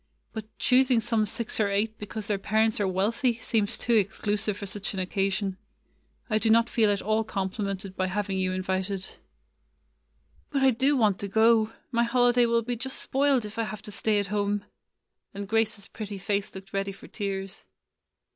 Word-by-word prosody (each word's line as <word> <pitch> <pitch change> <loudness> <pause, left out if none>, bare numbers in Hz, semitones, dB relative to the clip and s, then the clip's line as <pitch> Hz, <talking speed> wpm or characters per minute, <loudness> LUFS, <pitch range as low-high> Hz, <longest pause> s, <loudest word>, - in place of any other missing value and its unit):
But 220 -2 -5
choosing 255 -2 +4
some 220 -1 +1
six 225 +2 -3
or 210 -2 +3
eight 215 +2 0
because 210 +1 -5
their 205 -1 -1
parents 220 +2 +1
are 200 - +1
wealthy 220 +6 +1
seems 220 -3 0
too 240 - 0
exclusive 210 -1 +1
for 205 - -6
such 200 +1 -4
an - - -2
occasion. 195 +1 -1 0.7
I 215 -2 +1
do 225 - +1
not 230 +1 +4
feel 220 -3 +3
at 200 -1 0
all 215 +2 +1
compli 195 -3 -3
mented 195 -1 -4
by 185 0 0
having 195 0 -2
you 185 0 +1
invited." 190 +1 -3 1.3
''But 275 -2 +1
I 265 - +6
do 270 +4 +3
want 210 -5 +3
to 200 - -3
go. 220 +1 +4 0.2
My 235 -1 +2
holiday 245 0 +4
will 230 0 +2
be 245 +2 -2
just 260 +3 -4
spoiled 270 -3 +2
if 210 +2 -7
I - - +2
have 215 -1 -7
to 210 - -8
stay 215 +1 +1
at 200 0 -3
home;" 205 0 0 0.7
and 200 0 -5
Grace's 220 -2 0
pretty 210 -2 -6
face 200 +1 -2
looked 190 0 -10
ready 195 0 -1
for - - -13
tears. 195 -1 -4
210 Hz, 185 wpm, -27 LUFS, 195-230 Hz, 1.3 s, I